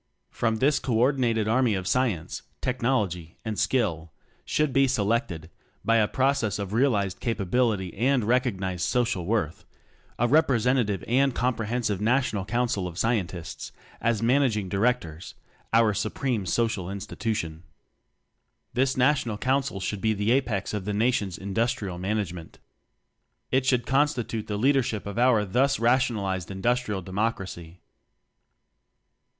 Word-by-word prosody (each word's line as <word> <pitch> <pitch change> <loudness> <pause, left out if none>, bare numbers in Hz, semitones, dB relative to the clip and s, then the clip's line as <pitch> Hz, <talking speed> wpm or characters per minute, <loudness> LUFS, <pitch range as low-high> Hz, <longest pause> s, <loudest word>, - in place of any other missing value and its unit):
From 115 -1 0
this 135 +5 +2
co 120 - -2
ordinated 120 -3 +2
Army 115 -1 +2
of 95 -1 -3
Science, 105 -5 -1 0.2
Technology, 105 -10 -1
and 110 -2 -3
Skill 85 -11 0 0.3
should 150 -3 0
be 135 +1 +4
selected 105 -8 -1 0.3
(by 115 0 +4
a 105 -2 +3
process 130 -6 +1
of 100 -1 -5
realized 110 -6 +1
capability 105 -3 0
and 125 +3 +2
recognized 100 -7 0
social 115 -6 0
worth) 100 -8 -1 0.5
a 120 - +2
representative 125 - +2
and 135 +2 +2
comprehensive 115 -4 -1
National 110 -4 +1
Council 120 -5 -1
of 85 -1 -9
Scientists 95 -7 -2 0.3
as 115 -1 +1
Man 130 +5 +4
aging 105 -8 0
Directors 90 - -1 0.4
our 115 -2 +4
Supreme 110 +1 -2
Social 110 -2 0
Institution. 100 -4 -4 1.1
This 130 +2 +1
National 125 -4 +2
Council 135 -3 0
should 100 +1 -3
be 110 +1 +2
the 105 +3 0
apex 120 -8 0
of 105 -3 -3
the 105 - -2
Nation's 105 -5 0
Industrial 100 -1 -2
Man 100 +4 -1
agement. 90 -5 -5 1.0
It 130 0 +2
should 125 -2 +2
constitute 130 -5 0
the 105 - -2
Leadership 125 -3 +1
of 100 +3 -4
our 120 -4 +4
thus 135 +8 +2
rationalized 110 -7 +1
Industrial 105 0 -1
Democracy. 95 -4 -4
110 Hz, 130 wpm, -26 LUFS, 95-125 Hz, 1.1 s, be